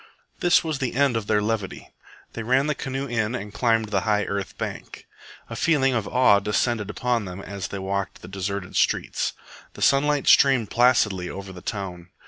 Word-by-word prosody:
This 175 0 +4
was 155 -4 -3
the 130 -3 -2
end 140 -2 +3
of 110 -2 -2
their 105 -1 +2
levity. 105 -3 -3 0.4
They 115 - -5
ran 130 +5 +2
the 150 - +1
canoe 135 0 -4
in 115 -2 -1
and 105 -4 -6
climbed 115 0 +1
the 100 -2 +1
high 105 +1 +1
earth 100 -1 -4
bank. - - -6 0.4
A - - -7
feeling 135 -5 +2
of 115 -4 -1
awe 115 -6 +4
descended 105 +1 -1
upon 120 0 -1
them 90 0 -7
as 100 -1 -6
they 100 - -6
walked 95 0 -4
the - - -8
deserted 95 0 -4
streets. - - 0 0.4
The - - -5
sunlight 145 +1 +3
streamed 130 -6 +5
placidly 110 -7 +3
over 95 -1 -8
the 90 - -10
town. 90 -4 -6
110 Hz, 185 wpm, -24 LUFS, 100-130 Hz, 0.4 s, streamed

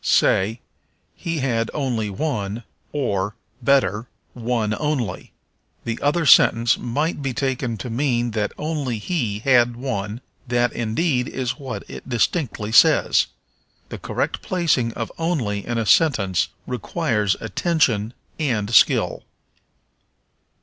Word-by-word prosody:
Say, 110 +5 +2 0.5
He 165 -1 -4
had 115 -4 0
only 120 -7 -1
one, 105 -2 -3 0.3
or, 105 -7 -1 0.3
better, 120 -4 +2 0.3
one 115 -3 -1
only. 140 -11 -2 0.5
The 115 0 -3
other 155 +3 +1
sentence 115 -4 +6
might 145 +6 -2
be 135 -3 -3
taken 130 -3 -1
to 105 - -6
mean 120 -2 0
that 105 -1 -1
only 150 -6 -2
he 110 - -2
had 120 -2 +4
one; 115 -3 -4 0.3
that, 120 -1 +1
indeed, 125 +3 0
is 130 +2 -3
what 135 -3 -6
it - - -10
distinctly 120 - -1
says. - - +5 0.6
The - - -7
correct - - -2
placing 160 -10 +1
of 115 - -4
only 125 - -1
in 120 -1 -1
a 115 - 0
sentence 105 - +3 0.2
requires 115 - -1
attention 115 - 0 0.2
and 115 -8 -1
skill. - - +4
120 Hz, 120 wpm, -22 LUFS, 110-140 Hz, 0.6 s, sentence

